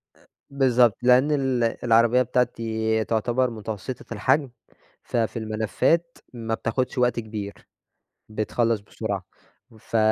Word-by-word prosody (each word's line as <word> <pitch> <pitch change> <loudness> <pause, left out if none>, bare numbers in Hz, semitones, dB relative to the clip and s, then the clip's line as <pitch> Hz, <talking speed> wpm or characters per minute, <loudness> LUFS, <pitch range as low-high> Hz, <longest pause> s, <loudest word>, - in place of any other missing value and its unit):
أ - - -26 0.2
بالضبط، 125 -5 +3
لأن 125 +4 +5
ال 135 -4 +1 0.2
العربيّة 115 +1 +4
بتاعتي 110 -3 0
تُعتبر 120 +3 0
متوسطة 110 +2 -6
الحجم، 145 -2 +1 0.5
ففي 115 0 -1
الملفات 110 +10 0 0.2
ما 115 -2 -4
بتاخدش 125 +4 -2
وقت 125 -1 +2
كبير، 105 -3 -6 0.8
بتخلّص 110 +1 0
بسرعة 100 - -4 0.6
ف 115 - -3
115 Hz, 105 wpm, -24 LUFS, 110-125 Hz, 0.8 s, لأن